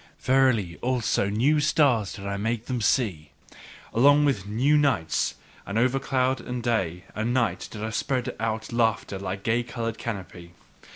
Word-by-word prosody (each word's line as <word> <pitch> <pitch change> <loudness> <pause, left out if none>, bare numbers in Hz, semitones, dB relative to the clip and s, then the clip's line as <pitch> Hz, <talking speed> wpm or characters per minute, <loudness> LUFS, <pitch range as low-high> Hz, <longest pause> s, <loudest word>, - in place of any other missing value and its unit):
Verily, 125 -9 +2
also 120 -5 0
new 130 +9 +2
stars 140 -8 +2
did 100 -2 -9
I 100 0 -2
make 110 +3 -2
them 125 -2 -2
see, 100 - 0 0.6
along 145 +5 +5
with 105 -9 0
new 125 +8 +2
nights; 135 - +1 0.3
and 100 - -4
over 130 +3 +2
cloud 130 -1 0
and 125 -1 -5
day 95 -7 -1
and 115 +3 -1
night, 115 -8 0
did 105 -1 -7
I 110 - -3
spread 125 +3 -2
out 110 0 -3
laughter 110 -4 0
like 95 0 -4
a - - -27
gay 115 +2 +1
coloured 115 -2 -4
canopy. 90 -6 -7
115 Hz, 165 wpm, -26 LUFS, 100-130 Hz, 0.6 s, along